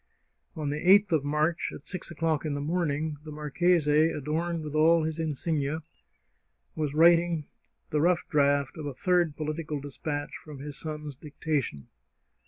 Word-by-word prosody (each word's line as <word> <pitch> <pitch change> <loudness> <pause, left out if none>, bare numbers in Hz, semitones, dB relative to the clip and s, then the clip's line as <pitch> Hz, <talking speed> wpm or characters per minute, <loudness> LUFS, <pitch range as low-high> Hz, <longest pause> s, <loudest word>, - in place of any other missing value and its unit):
On 150 -2 -2
the 150 - -2
8th 200 +3 +6
of 155 -4 +2
March, 150 +3 0
at - - -10
six 185 -3 -5
o'clock 160 -2 0
in 150 -3 -2
the - - -2
morning, 155 -1 -1
the 155 - -9
marchese, 150 +1 +2
adorned 160 +3 -2
with 150 -1 -6
all 160 +2 +5
his 160 +1 -3
insignia, 155 0 -1 0.9
was 150 -2 -2
writing 170 -1 +5 0.5
the 150 - +2
rough 175 +1 +2
draft 140 -3 +2
of 150 - -4
a 140 - -5
third 175 -2 +2
political 155 -1 -3
despatch 145 +1 -4
from 150 -2 -9
his 145 +1 -7
son's 150 -2 -6
dictation. 140 - -3
155 Hz, 155 wpm, -28 LUFS, 145-165 Hz, 0.9 s, 8th